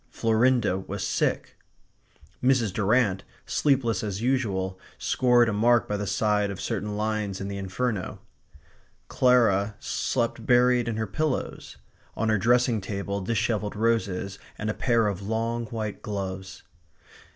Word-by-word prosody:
Florinda 115 -3 +2
was 95 +1 -5
sick. - - -1 0.8
Mrs. 125 -6 +3
Durrant, 105 -2 +2 0.2
sleepless 125 -8 +1
as 100 -2 -3
usual, 100 -7 -1 0.2
scored 120 -2 +3
a 110 - 0
mark 120 +3 +3
by 105 - -1
the 105 0 -3
side 105 0 +1
of 100 - -6
certain 105 -2 -3
lines 105 -2 -2
in 100 - -4
the 100 0 -4
Inferno. 100 +1 -3 0.9
Clara 110 -5 +3
slept 115 0 -2
buried 125 0 +4
in 115 -2 -2
her 110 - -1
pillows; 135 +8 -3 0.4
on 110 0 0
her 110 -2 +2
dressing 120 +1 +3
table 100 0 -3
dishevelled 105 +1 -1
roses 100 -4 -1 0.2
and 110 +1 -2
a - - -3
pair 115 -2 +2
of 100 -2 -2
long 115 +3 -2
white 110 -2 -5
gloves. 95 -2 -5
110 Hz, 135 wpm, -26 LUFS, 100-120 Hz, 0.9 s, buried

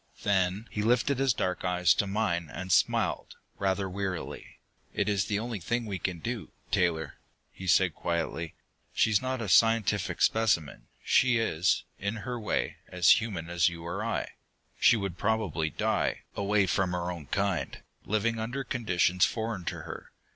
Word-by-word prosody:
Then 95 +2 +1
he 105 - -2
lifted 120 +4 +2
his 135 -1 +3
dark 90 -5 -2
eyes 90 -1 +3
to 100 - 0
mine, 90 -5 -1
and 95 0 -5
smiled, - - +1 0.2
rather 95 0 0
wearily. 90 -7 -5 0.4
"It - - 0
is 100 -3 +1
the 105 - -1
only 115 0 -3
thing 120 +7 -1
we 100 -3 -4
can 90 -2 -2
do, 115 +5 -5 0.2
Taylor," 80 -4 0 0.3
he 95 - -9
said 90 -2 +4
quietly. 85 -1 -3 0.4
"She 110 - +3
is 105 - +3
not 130 -2 -2
a - - -4
scientific 105 +2 +3
specimen; 105 -9 +1 0.2
she 130 -2 +4
is, 95 -5 +1 0.2
in 100 +3 -2
her 125 -1 -3
way, 105 - -1
as 90 +3 +5
human 95 -8 -4
as 85 0 +2
you 85 -1 -9
or 90 +5 -3
I. 115 - -1 0.5
She 120 - +6
would 100 -4 -4
probably 105 -8 0
die, - - 0
away 100 0 +2
from 95 -1 0
her 90 0 -2
own 80 -5 -8
kind, 100 -1 -1 0.2
living 110 +3 0
under 120 +5 -3
conditions 90 -7 +1
foreign 110 -5 -4
to - - -4
her. - - -9
100 Hz, 165 wpm, -29 LUFS, 90-110 Hz, 0.5 s, She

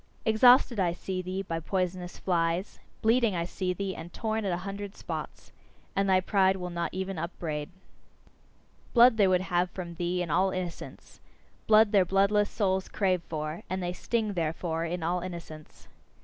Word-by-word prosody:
Exhausted 240 +1 +5
I 175 -3 +2
see 185 +1 -4
thee, 185 +2 -4
by 165 -3 -3
poisonous 180 +1 -3
flies; 170 +1 -1 0.2
bleeding 225 -2 +3
I 170 0 -1
see 180 +1 -3
thee, 190 +1 -3
and 165 +2 -8
torn 220 +1 -2
at 190 - 0
a 175 - 0
hundred 200 0 -6
spots; - - -7 0.4
and 195 0 +1
thy 185 -1 +5
pride 190 0 +2
will 180 -1 -5
not 170 0 -2
even 190 -1 -4
upbraid. 155 -3 -4 1.3
Blood 240 -1 +7
they 200 -3 +5
would 185 -1 +3
have 180 -1 0
from 175 -2 -7
thee 175 +1 -1
in 165 - -5
all 190 +4 +3
innocence; 185 -2 -7 0.5
blood 220 -1 +6
their 200 -3 +5
bloodless 200 +3 +2
souls 190 -3 0
crave 185 -3 +1
for 155 0 -4
and 185 0 -2
they 175 0 -2
sting, 220 +2 -1
therefore, 165 -1 -2
in 170 0 -3
all 175 +2 0
innocence. 170 -4 -9
185 Hz, 170 wpm, -28 LUFS, 170-200 Hz, 1.3 s, Blood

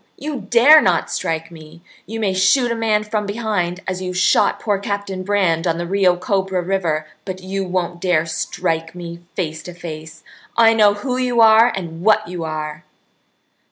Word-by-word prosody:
You 280 -9 -6
dare 280 +6 +7
not 180 -4 +1
strike 165 +1 -3
me! 160 +1 -14 0.2
You 225 +1 -5
may 200 -4 0
shoot 210 +7 +3
a - - -1
man 220 -2 +1
from 210 -1 -3
behind, 200 -5 -2
as 185 -1 -3
you 180 -1 -4
shot 180 - +2
poor 205 -3 -1
Captain 200 -1 -4
Brand 185 -4 0
on 165 -1 0
the 175 - -3
Rio 185 0 +2
Cobra 190 0 -1
River, 170 -5 -1 0.2
but 185 -1 -7
you 195 +1 -3
won't 175 -1 -3
dare 170 -4 +1
strike 165 0 -3
me 170 -1 -8 0.2
face 160 -4 -3
to 180 +2 -10
face. 160 -2 -9 0.3
I 225 -1 +6
know 210 -2 +4
who 250 +4 -3
you 250 -2 0
are 225 +1 +6
and 170 -3 -6
what 215 -1 +3
you 175 -1 -5
are!" 155 0 -5
185 Hz, 180 wpm, -19 LUFS, 170-210 Hz, 0.3 s, dare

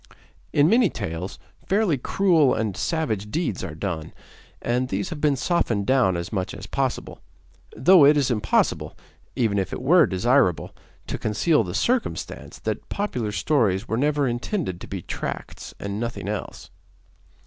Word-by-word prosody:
In 145 +1 +4
many 230 +1 +4
tales, 90 -2 -5 0.3
fairly 195 -5 +2
cruel 160 +1 +3
and 110 -4 -2
savage 110 - -2
deeds 150 - -2
are 75 - -5
done, 80 -3 -4 0.5
and 125 +2 -1
these 100 +1 -2
have 155 -3 -6
been 150 -2 +3
softened 120 - 0
down 125 -9 +3
as 85 +3 -5
much 95 -3 -2
as - - -8
possible; - - -3 0.5
though 180 +3 +6
it 145 +2 +6
is 135 -3 +2
impossible, 105 -7 0 0.4
even 110 -6 +1
if 95 - -2
it - - -4
were 155 +3 +5
desirable, 95 - +1 0.3
to - - -4
conceal 110 +7 +2
the 90 -2 -5
circumstance 250 0 -2
that - - -4
popular 125 - -2
stories 105 -5 +1
were 110 - -1
never 145 +2 +1
intended 120 - -3
to - - -8
be - - -6
tracts - - -6
and 100 +1 -4
nothing 115 -4 -4
else. 105 -1 -5
120 Hz, 155 wpm, -24 LUFS, 100-150 Hz, 0.5 s, though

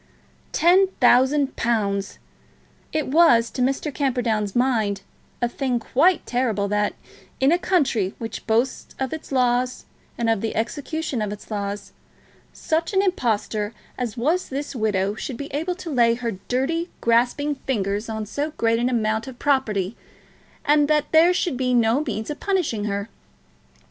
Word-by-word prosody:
Ten 370 +3 +5
thousand 265 +3 +4
pounds! 200 -4 -1 0.7
It 310 -3 -1
was, 260 -7 +5
to 255 - -4
Mr. 275 +3 0
Camperdown's 235 -7 0
mind, 220 -6 +1 0.4
a - - +4
thing 250 0 -1
quite 320 +10 +2
terrible 230 -5 0
that, 210 0 0 0.4
in 265 +2 +4
a 345 - +3
country 260 - +1
which 225 0 -7
boasts 235 +4 0
of 265 +1 -2
its 315 - -7
laws 250 -1 +1 0.3
and 235 - -1
of 225 -3 +2
the 225 - -3
execution 280 +3 -2
of 210 -1 -2
its 210 +2 -9
laws, 200 -1 -4 0.6
such 325 +4 -1
an 385 0 +3
impostor 220 - -1 0.2
as 245 -1 -4
was 315 +10 0
this 280 +1 -4
widow 205 -3 0
should 235 +3 -5
be 285 +2 -7
able 325 +5 -1
to 350 -3 -7
lay 235 -3 +4
her 235 -1 -3 0.2
dirty, 325 +8 0
grasping 245 +6 +2
fingers 210 -5 -2
on 220 -1 -3
so 285 +9 -3
great 230 0 +2
an 245 +1 +1
amount 220 -1 0
of 260 -2 -9
property, 230 -9 0 0.7
and 295 0 +4
that 300 -1 +1
there 325 +2 +6
should 355 -6 0
be 250 -1 +1
no 235 +4 +3
means 220 -2 -4
of 295 - -6
punishing 345 - 0
her. 200 0 -2
245 Hz, 155 wpm, -23 LUFS, 220-290 Hz, 0.7 s, there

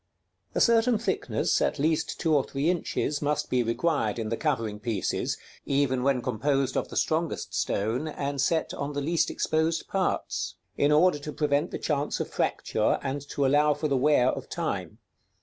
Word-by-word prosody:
_ - - -31
A - - +2
certain 230 0 +4
thickness, 225 - 0
at - - +1
least 155 +2 0
two 160 -2 +1
or 140 - +3
three 145 +6 0
inches, 150 -4 -2
must 150 0 -1
be 125 - +3
required 115 -1 0
in 110 -2 -3
the 115 - 0
covering 115 -8 -1
pieces 105 -3 -1 0.3
(even 135 -2 +1
when 130 -2 +1
composed 135 +2 0
of - - 0
the - - -10
strongest 160 0 -1
stone, 115 +9 -1
and 140 -2 -2
set 160 +4 +1
on 140 +1 -4
the 145 - -2
least 165 +4 +1
exposed 160 +1 0
parts), 190 -1 -1 0.2
in 145 - +2
order 155 +1 +4
to 150 +1 -6
prevent 150 +2 +1
the - - -4
chance 145 -1 -1
of - - -2
fracture, - - 0
and 140 +1 -2
to 140 - 0
allow 145 +2 +4
for 150 +2 -1
the 140 - +1
wear 130 -1 +4
of - - -4
time. - - -3
145 Hz, 185 wpm, -27 LUFS, 130-155 Hz, 0.3 s, certain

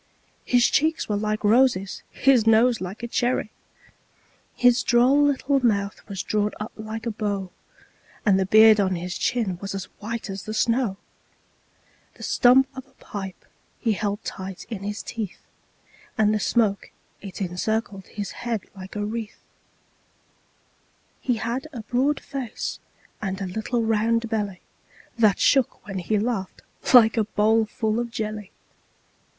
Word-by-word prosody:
His 245 -1 +4
cheeks 315 +2 +1
were 210 - 0
like 215 +1 -1
roses, 210 -3 +3
his 255 -5 +3
nose 225 +1 +4
like 190 +5 -6
a - - -2
cherry! 240 -2 0 1.0
His 245 0 +4
droll 250 +4 +4
little 280 -1 +2
mouth 200 -3 +1
was 195 -2 -4
drawn 210 -1 0
up 210 - -5
like 220 +1 -6
a 230 - -1
bow, 200 -3 -3 0.7
And 195 -3 +4
the 190 - 0
beard 215 +1 +7
of 190 -2 +2
his 175 +1 -4
chin 205 -7 -1
was 195 0 -4
as 195 - -3 0.2
white 230 +2 -5
as 195 -2 -6
the 215 - -4
snow; 230 -3 +1 1.2
The - - -11
stump 260 +2 +5
of 260 0 -8
a 270 - -27
pipe 195 -6 -8 0.3
he 230 - +1
held 205 +1 -2
tight 190 -1 -6
in 210 -4 -4
his 205 +1 -4
teeth, 220 -5 -5 0.8
And 215 -1 +3
the 215 - +1
smoke 210 -2 +1 0.3
it 195 -2 -8
encircled 195 +2 -2
his 205 -1 -5
head 235 -4 -3
like 190 +1 -10
a 205 0 -2
wreath; 220 0 -6 1.8
He 250 - +1
had 240 +5 -3
a 240 - -5
broad 260 +6 0
face 265 -5 -5 0.4
and 195 -2 -3
a - - -3
round 180 - -7
little 225 0 +1
belly, 210 -4 -3 0.6
That 215 -4 +5
shook 270 -4 +2
when 195 -2 -4
he 210 +5 0
laughed 205 -3 -3 0.3
like 230 -3 +7
a 220 - +4
bowlful 220 +1 +1
of 240 0 -2
jelly. 215 -3 -4
215 Hz, 150 wpm, -24 LUFS, 200-235 Hz, 1.8 s, beard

